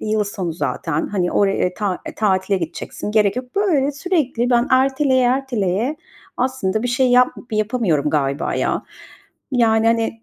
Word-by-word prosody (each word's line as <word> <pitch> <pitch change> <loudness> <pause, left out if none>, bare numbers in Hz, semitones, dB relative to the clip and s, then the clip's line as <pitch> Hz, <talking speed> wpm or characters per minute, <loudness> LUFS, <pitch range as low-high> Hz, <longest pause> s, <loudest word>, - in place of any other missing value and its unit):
Yıl 215 -1 0
sonu 190 -4 -4
zaten. 160 -1 -2
Hani, 180 -3 -1
oraya, 195 -2 +1
ta 200 -4 -2
eee, - - -6
tatile 195 -2 +1
gideceksin, 165 +4 -5
gerek 210 0 +2
yok." 250 +6 -6
Böyle 300 -9 +2
sürekli 275 -6 -1
ben 240 0 +3
erteleye 265 0 +3
erteleye 245 - 0 0.4
aslında 245 -5 -1
bir 245 - -1
şey 255 +1 +2
yap 250 0 +5 0.2
yapamıyorum 215 - 0
galiba 140 0 -1
ya. - - -1 0.7
Yani, 225 -2 +3
hani, 225 0 0
225 Hz, 145 wpm, -20 LUFS, 195-255 Hz, 0.7 s, yap